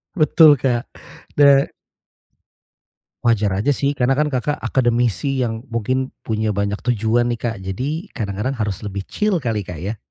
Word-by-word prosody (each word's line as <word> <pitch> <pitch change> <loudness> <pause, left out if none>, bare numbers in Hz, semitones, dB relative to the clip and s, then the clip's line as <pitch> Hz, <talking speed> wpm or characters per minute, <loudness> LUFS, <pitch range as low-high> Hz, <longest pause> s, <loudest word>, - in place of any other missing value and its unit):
Betul 155 -2 +6
kak, 120 -2 0 0.5
da 140 -1 +6 1.6
Wajar 110 -3 +3
aja 140 +8 +2
sih, 140 +1 -1
karena 125 +1 +2
kan 150 +2 +1
Kakak 145 +2 -2
akademisi 120 0 +1
yang 115 0 -3
mungkin 130 +4 -1
punya 110 -1 -1
banyak 100 +1 -1
tujuan 120 0 +2
nih, 115 - -6
Kak. 115 -2 -2
Jadi 145 - -4
kadang-kadang 105 +4 -3
harus 105 -1 -3
lebih 100 -1 -4
chill 210 -5 0
kali, 110 -6 -2
Kak, 85 -4 -7
ya. 105 +4 -4
120 Hz, 150 wpm, -20 LUFS, 105-140 Hz, 1.6 s, Betul